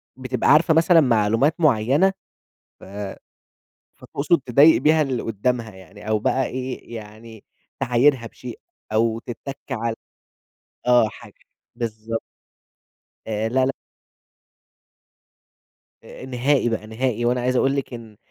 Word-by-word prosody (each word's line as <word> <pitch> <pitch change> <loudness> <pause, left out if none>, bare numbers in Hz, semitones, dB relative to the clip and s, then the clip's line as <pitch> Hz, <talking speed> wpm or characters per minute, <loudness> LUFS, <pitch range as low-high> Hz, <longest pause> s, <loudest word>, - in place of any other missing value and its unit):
بتبقى 130 -1 -1
عارفة 160 +2 +5
مثلًا 165 +1 +5
معلومات 115 +4 +2
معيّنة 145 - +3 0.7
ف - - -12 1.1
فتقصُد 145 +3 0
تضايق 140 +6 +6
بيها 155 0 +4
اللي 130 -4 -2
قُدّامها 115 0 -2
يعني 95 +3 -13
أو 110 -1 +2
بقى 130 +5 0
إيه، 130 -2 -6
يعني 110 0 -12 0.4
تعايرها 125 0 +2
بشيء 125 +1 -9 0.3
أو 115 +1 +1
تِتَّك 135 +3 -8
على 115 0 -2 0.9
آه، 125 -3 +5
حاجة - - -14 0.4
بالضبط. 115 -1 -4 1.1
آآ، 110 0 -2
لا، 130 +2 +2
لأ. 135 - +1 2.3
أ - - -11
نهائي 130 0 +1
بقى، 110 -2 -3
نهائي، 120 +1 -2
وأنا 125 +1 +1
عايز 125 +1 0
أقول 135 +2 +2
لِك 135 -2 -4
إن 115 -3 -11
120 Hz, 120 wpm, -22 LUFS, 110-135 Hz, 2.3 s, تضايق